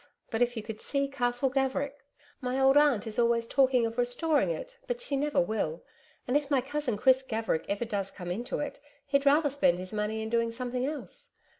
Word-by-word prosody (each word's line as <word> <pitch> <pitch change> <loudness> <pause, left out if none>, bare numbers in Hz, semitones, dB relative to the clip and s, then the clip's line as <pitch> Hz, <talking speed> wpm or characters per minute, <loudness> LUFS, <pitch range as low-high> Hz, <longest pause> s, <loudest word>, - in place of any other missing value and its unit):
But 225 - -1
if 245 0 +2
you 220 - -3
could 220 0 -7
see 280 -1 0
Castle 245 -1 0
Gaverick! 270 +1 -1 0.4
My 255 +1 -1
old 270 +1 +5
Aunt 290 -8 +4
is 220 +1 -3
always 235 -1 +3
talking 260 -3 +3
of 230 +1 -3
restoring 285 - +1
it, - - -5
but - - -2
she 485 -13 -1
never 290 +1 +1
will, 215 -10 -1 0.4
and 250 - 0
if 290 -1 +1
my 280 -3 +3
cousin 265 -3 -2
Chris 260 +3 +5
Gaverick 225 -10 -2
ever 200 +4 -1
does 200 -3 -2
come 180 -3 -7
into 235 +7 -3
it, 295 - -4 0.3
he'd 280 0 +1
rather 290 0 +4
spend 255 -11 +3
his 185 +2 -6
money 215 +1 -2
in 220 - -4
doing 230 0 +1
something 250 +2 -2
else.... 300 0 -7
250 Hz, 205 wpm, -29 LUFS, 225-280 Hz, 0.4 s, old